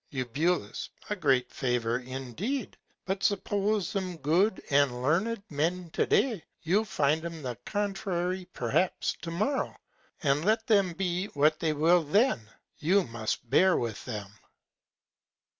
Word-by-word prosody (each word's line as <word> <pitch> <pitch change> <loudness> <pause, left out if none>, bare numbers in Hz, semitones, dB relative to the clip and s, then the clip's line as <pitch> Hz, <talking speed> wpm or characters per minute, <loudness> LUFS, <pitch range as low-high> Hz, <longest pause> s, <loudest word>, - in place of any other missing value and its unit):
Eu. 140 +7 0 0.4
A - - +1
great 135 -9 +2
Favour 120 -2 0
indeed. 135 - -4 0.3
But 190 +1 -2
suppose 205 -1 0
'em 185 -3 -2
good 175 +8 +2
and 140 -3 +3
learned 195 - +1
Men 165 +4 -1
to - - 0
Day, 225 -10 +2 0.2
you'll 195 +7 +2
find 160 -5 +1
'em 165 -2 -6
the 125 -2 -3
contrary 190 -3 -1
perhaps 125 +10 0
to 170 - -5
Morrow; 215 +12 -1 0.5
and 145 +1 +2
let 220 +3 +2
them 200 -5 +3
be 180 +1 -1
what 155 -2 +2
they 160 -2 +1
will 165 +4 +4
then, 160 - +2 0.3
you 185 +5 +3
must 115 0 -4
bear 185 +9 +4
with 115 -3 -3
them. 105 -4 -6
170 Hz, 135 wpm, -29 LUFS, 135-195 Hz, 0.5 s, will